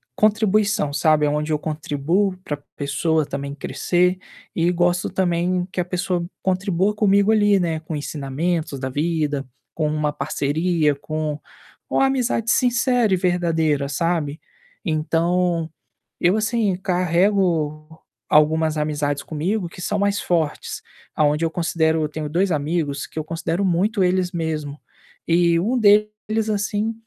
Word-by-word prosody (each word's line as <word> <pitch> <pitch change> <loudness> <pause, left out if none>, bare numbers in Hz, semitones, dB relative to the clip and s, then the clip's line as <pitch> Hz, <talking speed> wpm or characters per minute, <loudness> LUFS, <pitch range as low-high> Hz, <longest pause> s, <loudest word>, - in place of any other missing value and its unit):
contribuição, 215 -6 +2
sabe, 155 0 +3
aonde 150 +1 -1
eu 150 - +1
contribuo 155 +6 -1
pra 145 -5 -3 0.2
pessoa 155 +2 0
também 140 0 -5
crescer 175 +6 0 0.4
e 170 +1 +2
gosto 175 +1 +1
também 180 0 0
que - - -4
a 175 - -3
pessoa 180 -1 -2 0.2
contribua 190 +1 +1
comigo 200 0 +3
ali, 205 -2 +4
né, 165 -3 -1
com 160 0 -5
ensinamentos 145 +2 -2
da 130 0 -3
vida, 150 -1 -1 0.3
com 155 -2 -1
uma 150 -1 -1
parceria, 150 +1 0
com 155 +1 -4 0.5
uma - - +3
amizade 250 -4 0
sincera 245 -3 +2
e 185 - +3
verdadeira, 165 -5 +1
sabe. 155 0 -1 0.5
Então, 165 +1 0 0.5
eu 180 +3 +3
assim, 215 -3 +1
carrego 175 -4 0 0.3
algumas 155 +1 +3
amizades 150 -1 -1
comigo 175 +5 -2
que 180 - -11
são 205 - -1
mais 200 0 +1
fortes, 160 -4 -1 0.3
aonde 150 +1 +2
eu - - +1
considero 160 -2 +1
eu 150 - -2
tenho 155 -1 -5
2 180 +4 +1
amigos 150 -1 -1
que - - -16
eu 155 - -1
considero 165 +4 -2
muito 190 +4 +1
eles 180 0 +1
mesmo, 155 -3 -3 0.5
e 170 0 +3
um 230 +8 0
deles, 210 +1 +2
assim, 210 +2 -1
170 Hz, 135 wpm, -22 LUFS, 150-190 Hz, 0.5 s, ali